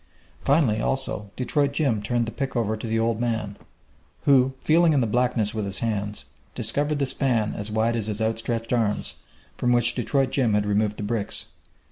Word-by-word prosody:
Finally, 135 -7 +3
also, 130 -6 -1
Detroit 140 +2 0
Jim 135 -8 +1
turned 120 +3 0
the 115 - -5
pick 135 +3 -4
over 110 -2 0
to 110 +1 -6
the 115 0 0
old 115 0 0
man, 110 -4 -2 0.7
who, 135 -1 +4
feeling 165 +2 +4
in 145 - +3
the 125 - +2
blackness 120 -2 +1
with 110 -1 -2
his 100 0 -3
hands, 105 -2 -2 0.3
discovered 145 +7 0
the 140 - +1
span 120 -5 +1
as 105 +1 -4
wide 110 +2 +1
as 110 -2 -2
his 105 -1 -2
outstretched 115 +1 -1
arms, 110 -4 0 0.4
from 125 - +1
which 120 -1 +4
Detroit 135 +2 0
Jim 120 -6 +2
had 105 0 +1
removed 105 0 +1
the - - -5
bricks. 105 0 -3
115 Hz, 185 wpm, -25 LUFS, 105-130 Hz, 0.7 s, who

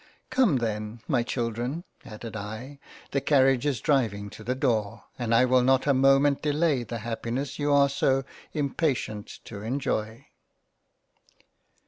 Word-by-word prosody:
Come, 255 - +4
then 110 -2 -2
my 130 -6 +2
Children 120 +6 -3 0.2
(added 110 +1 -8
I) 110 +7 -7 0.3
the 140 - 0
Carriage 135 -2 +3
is 135 -5 0
driving 105 -8 0
to 110 - -11
the 125 +4 -1
door, 115 -5 0 0.2
and 120 -2 -2
I 115 +2 +5
will 130 0 +4
not 130 +1 +3
a 140 - +4
moment 135 +1 +4
delay 150 -2 +1
the 120 0 -5
happiness 120 +5 -3
you 145 0 +1
are 140 0 +5
so 135 -1 +1 0.3
impatient 140 -7 -1 0.2
to 100 -3 -8
enjoy." 115 -2 -2
130 Hz, 140 wpm, -27 LUFS, 115-140 Hz, 0.3 s, I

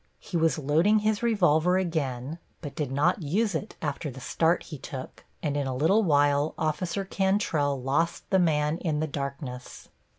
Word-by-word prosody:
He - - -9
was 165 -1 +2
loading 160 +9 +3
his 215 0 +1
revolver 180 -6 +3
again, 155 -5 -2 0.2
but 145 -4 -6
did 145 -2 -3
not 160 +8 +2
use 195 +8 0
it 160 - -4
after 150 +1 -2
the 130 0 -9
start 165 +6 +1
he 150 -5 -9
took, 130 0 -8 0.2
and 145 -3 -1
in 140 -2 -1
a 130 - -2
little 165 +11 +3
while 145 -3 +2
Officer 170 +4 -1
Cantrell 190 -8 +1
lost 140 +6 -1
the 190 - +5
man 155 -1 +2
in 155 -4 -1
the 155 - 0
darkness. 140 -3 -6
155 Hz, 170 wpm, -27 LUFS, 145-180 Hz, 0.2 s, the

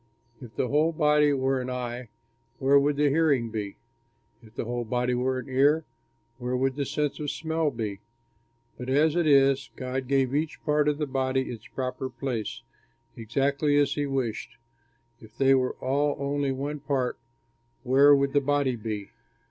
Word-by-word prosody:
If 115 -4 -11
the - - 0
whole 155 +3 +3
body 150 -1 +3
were 135 -1 0
an 125 - -5
eye, 125 -1 -5 0.5
where 140 +1 +4
would 145 +1 +1
the 145 0 +3
hearing 140 -6 +2
be? 105 -3 -5 0.6
If 110 -1 -18
the - - -3
whole 120 +1 -2
body 125 +2 -1
were 130 +1 0
an 130 - -6
ear, 145 +4 +3 0.5
where 125 0 -2
would 130 0 0
the 140 -2 -2
sense 150 0 -2
of 150 -1 -3
smell 160 0 -1
be? 110 -6 -4 0.8
But 125 +1 -5
as 150 +4 +3
it 170 -2 +2
is, 135 -1 +4
God 130 0 -4
gave 135 -1 +1
each 155 +2 -1
part 150 -1 +2
of 150 -1 +1
the 150 - -1
body 130 -1 -1
its 115 - -9
proper 130 0 -4
place, 120 -3 -4 0.5
exactly 140 +6 0
as 145 -1 +3
he 145 -1 -2
wished. 130 -6 -3 0.6
If 110 +1 -17
they 135 0 +4
were 130 -1 +2
all 145 +2 0
only 140 0 -1
one 140 +3 -4
part, 135 -3 -2 0.6
where 140 +3 +6
would 140 0 0
the 145 - +4
body 140 -2 +1
be? 105 -3 -5
135 Hz, 170 wpm, -27 LUFS, 125-145 Hz, 0.8 s, where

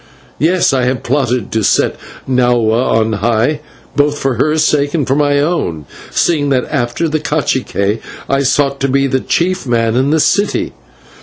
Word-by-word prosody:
Yes, 170 +1 +2
I 130 -2 +1
have 125 -1 -1
plotted 125 -2 -1
to 110 -1 0
set - - +2 0.3
Nahua 120 -2 +2
on 110 0 -1
high, 115 +7 0 0.4
both 145 0 +1
for 135 -2 -1
her 155 +5 +1
sake 145 -1 +1
and 150 -5 0
for 135 - +1
my 145 -1 +2
own, 140 - -1 0.2
seeing 150 -4 +1
that 130 -2 +1
after 135 +3 -1
the 155 0 -1
/cacique/ 130 -9 -1 0.3
I 135 0 +1
sought 140 0 +1
to 135 - 0
be 135 +1 +1
the 130 -1 0
chief 180 +2 -1
man 115 -1 +1
in 130 +3 +2
the 160 +2 +2
city. 205 +6 +1
135 Hz, 170 wpm, -14 LUFS, 120-150 Hz, 0.4 s, Yes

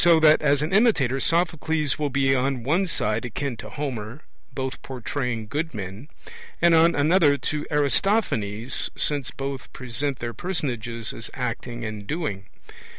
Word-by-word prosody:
So 170 -2 +6
that 155 0 +6
as 145 -1 +3
an 155 - -2
imitator 170 - +3
Sophocles 160 -3 +1
will 150 -1 0
be 135 0 +2
on 130 -1 0
one 170 +9 +1
side 110 -8 0
akin 125 +2 -3
to - - -8
Homer, 130 -2 -5 0.3
both 130 0 -4
portraying 125 -3 -3
good 150 +4 -3
men; 100 +6 -6 0.5
and 170 0 +5
on 165 +1 +5
another 150 0 +4
to 150 +1 -3
Aristophanes, 140 - +1
since 145 -3 +1
both 135 -1 -6
present 135 +2 -2
their 120 0 -5
personages 120 - -3
as 115 - -7
acting 120 -1 -4
and 105 -2 -6
doing. 125 - -3
135 Hz, 150 wpm, -24 LUFS, 120-155 Hz, 0.5 s, So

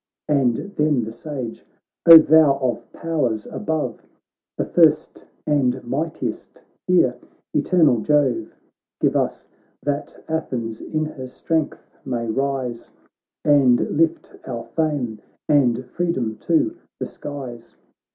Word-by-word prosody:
And 135 -6 +2 0.2
then 150 -5 +2
the 110 - -5
Sage: 130 -2 -7 0.2
' - - -68
Oh, 165 - +14
thou 155 -3 +5
of 130 -3 -3
powers 130 -10 -2
above 160 - -3 0.6
The - - -1
first 155 -3 +2 0.2
and 130 -4 +1
mightiest, 145 +7 -4 0.2
hear, 150 -9 +3 0.4
eternal 150 -5 +3
Jove! 130 -5 +1 0.4
Give - - +1
us, - - -1 0.4
that 145 0 -4
Athens 125 -8 -3
in 155 0 -2
her 130 -4 -7
strength 155 +4 -2 0.2
may 120 -3 -3
rise, 130 -1 -2 0.6
And 135 -5 +5 0.2
lift 165 +1 0
our 120 -3 -4
fame 145 -9 -1 0.3
and 130 -4 +2
freedom 130 -7 -2
to 170 - +1 0.2
the - - -2
skies 120 -6 -8
140 Hz, 115 wpm, -22 LUFS, 120-155 Hz, 0.6 s, Oh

